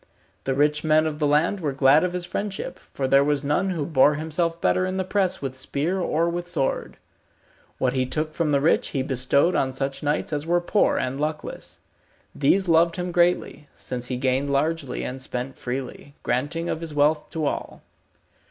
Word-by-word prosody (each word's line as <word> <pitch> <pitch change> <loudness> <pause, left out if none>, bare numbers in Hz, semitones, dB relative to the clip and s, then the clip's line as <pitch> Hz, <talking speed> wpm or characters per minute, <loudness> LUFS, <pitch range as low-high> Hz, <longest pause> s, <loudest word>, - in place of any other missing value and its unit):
The 135 - 0
rich 150 +1 +2
men 155 0 +4
of 150 -1 -3
the 150 - +2
land 155 +7 +2
were 150 -5 -2
glad 135 +3 +5
of 180 -1 -1
his 180 -1 -2
friendship, 195 +2 -4
for 135 - -2
there 135 +1 +5
was 145 0 0
none 150 +7 +1
who 165 -6 -2
bore 145 -1 +4
himself 165 +2 -1
better 185 - +2
in 185 0 -2
the 190 - 0
press 185 -3 0
with 130 -1 -3
spear 145 +7 -2
or 170 -2 +1
with 175 +1 -3
sword. 135 -6 -2 0.8
What 125 -1 0
he 130 -1 0
took 155 +4 -2
from 165 -2 0
the 140 -1 +2
rich 160 - +3
he 130 - +1
bestowed 135 +6 +2
on 130 - +1
such 135 +1 -3
knights 150 +1 -1
as 145 0 -1
were 175 +1 +3
poor 190 +4 +2
and 130 +2 -2
luckless. 155 +1 -5 0.5
These 185 +7 +2
loved 170 0 +4
him 180 0 -3
greatly, 175 -3 +1
since 125 -1 -4
he 125 - -3
gained 135 +2 0
largely 145 -1 -1
and 130 +1 -5
spent 130 +1 -4
freely, 130 +3 -6
granting 145 +7 -1
of 160 - -3
his 160 -3 -5
wealth 150 +1 +2
to 160 -2 -3
all. - - -4
150 Hz, 195 wpm, -24 LUFS, 135-170 Hz, 0.8 s, glad